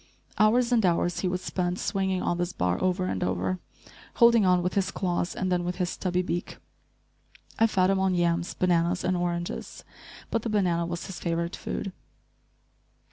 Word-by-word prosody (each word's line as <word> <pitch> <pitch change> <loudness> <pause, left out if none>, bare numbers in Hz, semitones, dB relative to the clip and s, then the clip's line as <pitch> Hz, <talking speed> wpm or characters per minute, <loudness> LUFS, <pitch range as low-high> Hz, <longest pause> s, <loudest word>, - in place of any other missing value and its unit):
Hours 235 +3 +4
and 235 -3 +3
hours 175 -1 +1
he 185 - 0
would 180 0 -2
spend, 180 -1 -2
swinging 190 -2 -1
on 175 - 0
this 175 +1 -1
bar 90 0 0
over 185 0 +1
and 95 - -2
over, 90 0 -1 0.6
holding 235 -4 +6
on 180 -1 +3
with 180 - -1
his 195 -1 +1
claws, 175 -2 -2
and 185 -1 -1
then 175 -1 +1
with 175 +1 -2
his 180 -1 -1
stubby 180 -1 -1
beak. 175 -1 -4 1.0
I 225 - +6
fed 190 -3 +2
him 195 - +1
on 190 -1 +2
yams, 170 0 0
bananas 175 0 +1
and 185 - +1
oranges, 175 -1 -3 0.5
but 230 - +1
the 230 - -3
banana 175 -5 +1
was 170 0 -4
his 190 -4 -7
favorite 170 +1 -2
food. 195 - -5
180 Hz, 180 wpm, -27 LUFS, 175-190 Hz, 1.0 s, holding